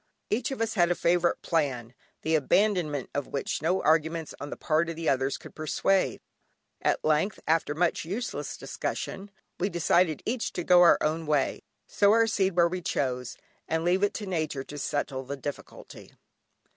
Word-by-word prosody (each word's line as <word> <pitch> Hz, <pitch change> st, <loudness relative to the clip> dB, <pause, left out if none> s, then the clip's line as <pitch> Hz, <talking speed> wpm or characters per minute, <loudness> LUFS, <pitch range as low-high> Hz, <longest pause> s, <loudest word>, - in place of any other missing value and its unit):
Each 230 Hz, +3 st, 0 dB
of 270 Hz, -4 st, -4 dB
us 225 Hz, 0 st, 0 dB
had 175 Hz, -4 st, +3 dB
a 175 Hz, -, +2 dB
favourite 175 Hz, 0 st, +1 dB
plan, 130 Hz, -8 st, -1 dB, 0.3 s
the 160 Hz, -, 0 dB
abandonment 160 Hz, -, +1 dB
of 145 Hz, -, -2 dB
which 140 Hz, -, -3 dB
no 180 Hz, +4 st, +1 dB
arguments 160 Hz, +1 st, +1 dB
on 145 Hz, -, -5 dB
the -, -, -6 dB
part 155 Hz, +1 st, +1 dB
of 165 Hz, -, -4 dB
the 165 Hz, 0 st, -4 dB
others 135 Hz, 0 st, +1 dB
could -, -, -13 dB
persuade. 185 Hz, +5 st, 0 dB, 0.6 s
At -, -, 0 dB
length, 155 Hz, +7 st, +1 dB
after 155 Hz, -2 st, +1 dB
much 175 Hz, +1 st, +1 dB
useless 200 Hz, +9 st, -4 dB
discussion, 195 Hz, +1 st, -5 dB, 0.3 s
we 190 Hz, -, +1 dB
decided 170 Hz, -2 st, +2 dB
each 235 Hz, 0 st, -2 dB
to 175 Hz, -, -3 dB
go 180 Hz, +1 st, +6 dB
our 175 Hz, -, +7 dB
own 160 Hz, +1 st, -1 dB
way, 145 Hz, -3 st, +1 dB, 0.2 s
sow 205 Hz, 0 st, +3 dB
our 230 Hz, 0 st, +5 dB
seed 195 Hz, -4 st, 0 dB
where 170 Hz, -1 st, +5 dB
we 180 Hz, +1 st, -4 dB
chose, 125 Hz, -6 st, -2 dB, 0.3 s
and 160 Hz, +1 st, -1 dB
leave 180 Hz, +2 st, +2 dB
it 205 Hz, -, +1 dB
to 210 Hz, -, -4 dB
Nature 155 Hz, -7 st, -2 dB
to 145 Hz, +1 st, -8 dB
settle 140 Hz, -2 st, -2 dB
the 140 Hz, +2 st, -6 dB
difficulty. 140 Hz, +2 st, -8 dB
165 Hz, 180 wpm, -28 LUFS, 145-185 Hz, 0.6 s, our